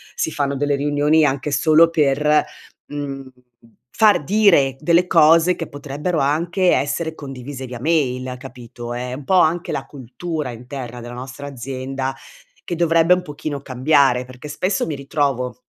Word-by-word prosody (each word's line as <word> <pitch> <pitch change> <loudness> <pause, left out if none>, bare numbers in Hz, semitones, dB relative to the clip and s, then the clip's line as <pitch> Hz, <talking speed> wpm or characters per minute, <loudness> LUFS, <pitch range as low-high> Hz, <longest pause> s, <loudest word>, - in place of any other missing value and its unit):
si - - -1
fanno 140 -2 -1
delle 145 +1 +1
riunioni 145 +2 +2
anche 140 +1 -1
solo 155 +3 +5
per, 150 -1 +2 0.4
mhmm, 135 -2 -6 0.7
far 210 -8 +5
dire 180 -8 +4
delle 170 +3 +3
cose 165 +1 +5
che 165 - -5
potrebbero 145 +4 -3
anche 170 +6 +1
essere 160 +3 -1
condivise 135 -1 -8
via 125 -2 -8
mail, 130 -4 0
capito? 120 -2 -9
È 125 +1 -4
un 135 +2 -7
po' 190 - 0
anche 170 +1 +1
la - - -3
cultura 145 +2 -5
interna 125 0 -8
della 120 +1 -8
nostra 130 +3 -8
azienda 135 0 -5 0.5
che 175 - -4
dovrebbe 165 +1 +4
un 180 - -4
pochino 145 -2 -5
cambiare 130 -1 +2
perché 130 +3 -11
spesso 185 +6 -1
mi 155 - -3
ritrovo 135 -3 -2
145 Hz, 150 wpm, -20 LUFS, 130-160 Hz, 0.7 s, solo